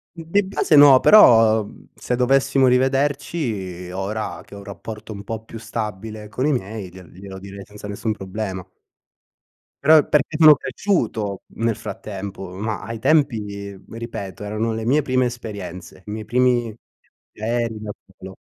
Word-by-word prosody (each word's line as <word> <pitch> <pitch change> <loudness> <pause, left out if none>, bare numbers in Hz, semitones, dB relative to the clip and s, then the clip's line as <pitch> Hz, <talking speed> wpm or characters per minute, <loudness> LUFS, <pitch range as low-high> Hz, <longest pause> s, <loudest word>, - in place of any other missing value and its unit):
Mhmm, 165 - -9
di 205 +3 +3
base 190 -4 +1
no, 145 -3 +9
però 115 - +7 0.3
se 125 - -3
dovessimo 135 +1 +3
rivederci, 125 - -1
ora 105 +3 -4
che 100 - -14
ho - - -9
un 100 - -10
rapporto 105 +2 -8
un 100 0 -8
po' 110 0 -6
più 115 0 -10
stabile 110 -1 -6
con 130 +5 -2
i - - +2
miei, 105 -5 -4
gliel 90 -2 -14
glielo 95 +1 -10
direi 100 0 -10
senza 105 0 -11
nessun 105 +2 -2
problema. 95 -2 -5 1.2
Però 155 +2 +7
è 150 - +4
perché 150 +1 +1
sono 155 -2 +9
cresciuto, 115 - -2
nel 115 -1 -1
frattempo, 95 -2 -7
ma 105 +4 -4
ai 115 -1 -6
tempi, 105 -10 0
ripeto, 110 -5 -7
erano 110 +2 -2
le 110 0 -4
mie 145 +5 +3
prime 130 -2 +1
esperienze, 100 -7 -8
i 105 - -7
miei 110 0 -5
primi 120 -1 +1 0.6
aerei 115 0 -2
da 105 -1 -6 0.3
solo. 95 0 -10
110 Hz, 155 wpm, -21 LUFS, 100-125 Hz, 1.2 s, no